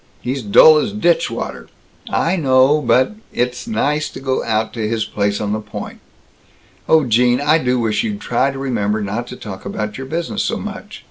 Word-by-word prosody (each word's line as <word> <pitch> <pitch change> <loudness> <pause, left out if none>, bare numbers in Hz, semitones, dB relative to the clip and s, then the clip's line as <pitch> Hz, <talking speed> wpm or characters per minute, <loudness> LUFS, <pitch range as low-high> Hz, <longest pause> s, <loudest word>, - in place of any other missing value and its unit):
He's 130 +2 -3
dull 150 +9 +7
as 205 +7 -2
ditchwater 170 - -1 0.3
" - - -16 0.2
"I 175 - +2
know, 135 -1 +3
but 130 0 +3 0.2
It 125 - 0
is 125 - -10
nice 155 -9 0
to - - -9
go 135 -1 -1
out 110 -1 -1
to 110 -3 -2
his 110 0 -1
place 100 0 -1
on 105 -1 -2
the 110 - -1
Point. 105 -1 -8 0.9
Oh, 160 -1 +5
Gene, 125 +1 +3
I 150 +3 +3
do 125 -3 0
wish 110 -2 0
you'd 105 -2 -3
try 120 +4 0
and 135 -1 -4
remember 110 -6 -1
not 105 +4 -3
to 125 - -8
talk 95 -6 -9
about 105 +3 -4
your 135 - -6
business 165 +4 -3
so - - -1
much. - - -8
125 Hz, 200 wpm, -18 LUFS, 110-145 Hz, 0.9 s, dull